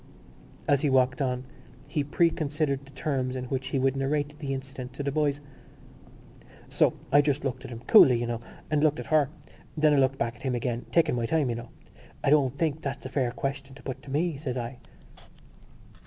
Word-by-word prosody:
As 140 -1 +3
he 145 - +2
walked 130 0 +3
on 125 -1 -1 0.4
he 150 - -1
preconsidered 150 -2 0
the 135 - -16
terms 130 -2 -1
in 130 -1 -3
which 130 -1 -2
he - - -1
would 135 0 +2
narrate 145 +2 -1
the 140 -2 -4
incident 135 -1 -6
to 145 - -5
the 140 - -1
boys: 145 -1 0 1.3
"So, - - +3 0.2
I 145 - +7
just 145 -1 0
looked 130 - -3
at - - -7
him—coolly, 120 +1 +6
you 120 - -1
know, 120 -1 -3 0.3
and 150 -1 +2
looked 155 -1 +3
at - - -5
her. 150 -3 +4 0.5
Then 150 -1 +4
I - - +4
looked 135 0 +3
back 115 -1 -1
at - - -19
him 130 -2 -1
again—taking 125 +7 +1
my 115 -1 -1
time, 155 -3 +1
you - - -2
know. 120 0 -7 0.5
'I - - +3
don't 140 -3 +3
think 155 -2 0
that - - -20
that's 140 -3 -5
a - - -4
fair 130 -2 0
question 135 +2 -4
to - - -14
put 130 - -5
to - - -13
me,' 155 +2 0
says 135 -3 -4
I." 120 +1 -5
135 Hz, 205 wpm, -27 LUFS, 130-145 Hz, 1.3 s, I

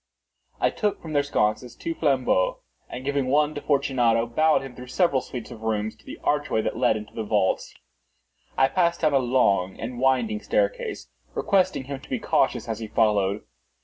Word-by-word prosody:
I - - +2
took 210 -2 -1
from 160 -2 -8
their 145 - +4
sconces 120 -3 -1
two 165 - -4
flambeaux, 130 - +1 0.3
and 130 - -7
giving 140 -2 0
one 150 +3 +2
to 145 - -5
Fortunato, 125 -5 +2
bowed 155 +6 +2
him 135 -2 -9
through 125 0 -10
several 140 -1 +2
suites 125 -3 -8
of 110 - -10
rooms 110 -1 -1
to 110 - -23
the - - -7
archway 145 -7 +1
that - - -2
led - - +2
into 105 0 -9
the 115 - -4
vaults. 105 -3 0 0.8
I 135 - +5
passed 170 +2 +1
down 155 -3 +3
a 135 - +5
long 100 -7 +1
and 120 +2 -5
winding 135 - +1
staircase, - - -1 0.3
requesting 190 -7 +1
him 135 +1 -6
to - - -16
be - - -1
cautious - - +1
as 110 -1 -3
he 110 - -5
followed. 105 -2 +1
130 Hz, 185 wpm, -25 LUFS, 110-150 Hz, 0.8 s, I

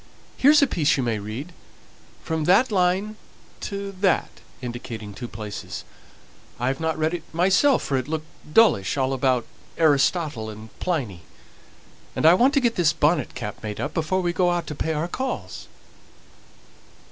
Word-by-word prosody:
"Here's 290 +2 +6
a - - +7
piece 155 - +1
you 135 - 0
may 115 -3 -1
read, 115 - -6 0.7
from 160 -1 -2
that 220 +8 +4
line 195 +3 +1 0.4
to 200 0 -5
that," 190 -4 +1 0.2
indicating 120 -4 -7
two 120 +4 -7
places. 105 -2 -7 0.8
"I 125 +2 +1
haven't 160 +4 -1
read 160 +1 0
it 175 - -3
myself 195 - +3
for 135 - 0
it 130 0 -3
looked 155 0 -3 0.3
dullish 150 - +4
all 135 0 +1
about 130 -2 +1 0.3
Aristotle 145 -5 +2
and 110 0 -10
Pliny 125 - -2 0.9
and - - 0
I 165 - +9
want 255 +10 +4
to - - +5
get 240 -3 0
this 165 -4 +3
bonnet 150 -3 +1
cap 105 - -6
made 105 -1 -5
up 145 - -3
before 180 +3 0
we 175 -1 -1
go 180 0 +2
out 175 -1 -1
to - - -5
pay 160 +2 -2
our 155 +2 -1
calls." 260 +9 -5
155 Hz, 160 wpm, -24 LUFS, 125-185 Hz, 0.9 s, I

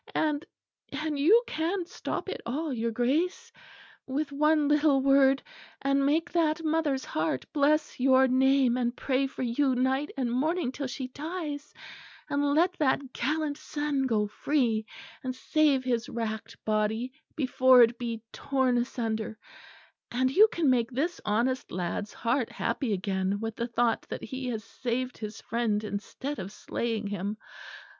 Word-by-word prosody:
And 300 -1 +1 0.5
and, 300 0 -3
you 415 - +6
can 340 +2 -1
stop 355 - -5
it 385 - -5
all, 280 +5 -2
your 230 -1 -1
Grace, 325 - 0 0.6
with 280 +2 -2
one 300 +1 +3
little 295 -1 +4
word; 275 0 +4 0.4
and 275 0 +2
make 300 +4 +1
that 325 -1 +1
mother's 305 -4 0
heart 155 -4 -1
bless 300 0 +2
your 265 0 +5
name 260 -1 +3
and 240 -1 -1
pray 270 0 +1
for 265 - -6
you 255 +2 +1
night 265 +3 +1
and 250 -3 0
morning 300 +3 0
till 275 0 -4
she 255 +1 -5
dies; 300 0 -5 0.6
and 285 0 +1
let 350 +4 +3
that 270 -2 +1
gallant 300 +3 -1
son 290 -3 -1
go 215 -4 +2
free, 225 -1 0 0.4
and 255 -1 -3
save 285 -1 +2
his 240 -2 -1
racked 220 -2 -4
body 220 +4 0 0.2
before 260 -3 +6
it 235 +1 +1
be 230 -2 -4
torn 260 -3 +1
asunder; 225 -3 -3 0.7
and 255 +2 +1
you 420 +10 +7
can 340 -7 -1
make 240 -3 +3
this 300 +8 -2
honest 240 +5 0
lad's 180 +3 -3
heart 240 +1 0
happy 260 -6 -2
again 190 0 -1
with 225 0 -4
the 235 - -2
thought 235 -1 +1
that - - -5
he 260 +2 -5
has 225 -3 -3
saved 250 +2 -3
his 215 -1 -6
friend 220 -2 -1
instead 220 +7 -5
of 190 +1 -6
slaying 225 +1 -3
him. 205 +1 -3
260 Hz, 150 wpm, -28 LUFS, 235-295 Hz, 0.7 s, you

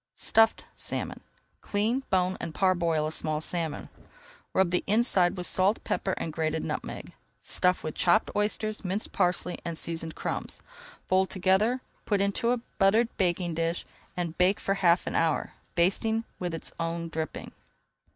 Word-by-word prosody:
STUFFED 225 0 +4
SALMON - - -3 0.4
Clean, 220 +6 0
bone, 185 -1 +2
and 160 - -5
parboil 170 -5 +2
a 155 - -2
small 155 -1 0
salmon. 165 -1 -3 0.6
Rub 190 -2 +2
the 180 - +1
inside 200 -4 +3
with 180 - -3
salt, 190 +5 +2
pepper, 190 - -1
and 160 - -4
grated 160 0 -1
nutmeg. - - -5 0.3
Stuff 180 0 +2
with 155 - -3
chopped 185 +5 +3
oysters, 210 +1 0
minced 195 +3 -2
parsley, 180 -1 0
and 170 -1 -4
seasoned 165 -1 -3
crumbs. - - -3 0.4
Fold 190 0 +3
together, 200 +7 +2 0.2
put 205 -2 +1
into 200 +4 +1
a 245 - +3 0.2
buttered 220 +4 +4
baking 175 -2 +1
dish, 165 +1 -1 0.3
and 170 -2 -2
bake 185 +3 +4
for 195 - 0
half 180 -3 +3
an - - -3
hour, 160 -2 +1 0.2
basting 220 +6 +2 0.2
with 175 -2 -2
its 165 - -4
own 165 0 -2
dripping. 160 -1 -5
180 Hz, 150 wpm, -28 LUFS, 165-200 Hz, 0.6 s, STUFFED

